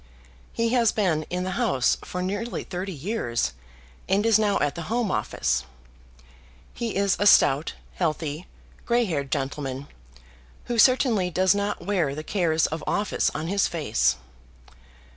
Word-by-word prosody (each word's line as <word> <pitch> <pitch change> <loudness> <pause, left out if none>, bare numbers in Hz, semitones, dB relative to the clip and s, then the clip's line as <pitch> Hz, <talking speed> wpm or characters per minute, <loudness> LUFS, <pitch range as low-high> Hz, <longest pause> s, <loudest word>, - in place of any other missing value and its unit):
He 230 0 0
has 235 -2 +3
been 165 -8 0
in 180 0 -2
the 185 +5 -3
House 135 - +2
for 180 0 -4
nearly 205 +5 -3
thirty 185 +1 -5
years, 155 - -2 0.6
and 200 +3 +2
is 225 -2 +5
now 205 -2 +2
at 145 - 0
the 170 -2 -7
Home 230 -3 0
Office. - - -1 1.1
He 235 -2 -4
is 200 -1 +2
a 205 - +3
stout, 145 -5 +5 0.2
healthy, 155 -1 -2 0.4
grey 240 0 +2
haired 145 -8 -2
gentleman, 135 -1 -3 0.8
who 240 -1 -2
certainly 230 -6 +4
does 185 +3 +3
not 200 -3 -2
wear 175 -9 0
the 155 - -5
cares 165 -3 +1
of 160 0 -3
office 205 0 +1
on 155 +2 -3
his 195 +3 +1
face. 65 - +1
185 Hz, 145 wpm, -25 LUFS, 155-210 Hz, 1.1 s, is